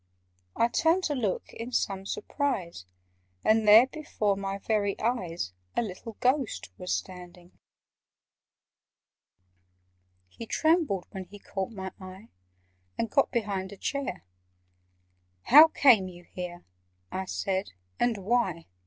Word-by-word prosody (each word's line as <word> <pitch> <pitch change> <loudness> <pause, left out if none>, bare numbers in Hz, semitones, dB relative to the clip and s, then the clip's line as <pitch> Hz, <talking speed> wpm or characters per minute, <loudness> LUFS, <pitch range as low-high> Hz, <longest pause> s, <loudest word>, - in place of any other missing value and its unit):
I 230 - +3
turned 330 +8 +2
to 300 - 0
look 220 -9 -2
in 235 +2 -7
some 195 -5 -1
surprise, 180 - -3 0.6
And 220 0 +3
there, 220 +4 +9
before 260 -8 -2
my 195 0 -3
very 200 -1 -1
eyes, 180 - -2 0.2
A - - +3
little 220 +2 -7
Ghost 250 - 0
was 180 - -4
standing! 180 -1 -6 2.8
He 225 - -10
trembled 315 - +1
when 190 -1 -6
he 205 - -13
caught 195 -1 -4
my 190 -4 -6
eye, 190 +3 -11 0.7
And 230 - -2
got 275 - +3
behind 200 -5 -2
a 200 - -10
chair. 270 -3 -3 1.2
"How 300 +5 +9
came 245 -11 +5
you 175 -1 -11
here," 175 0 -8 0.5
I 190 0 -3
said, 190 +1 -2 0.3
"and 240 -2 +2
why? 195 -4 0
200 Hz, 120 wpm, -28 LUFS, 185-240 Hz, 2.8 s, there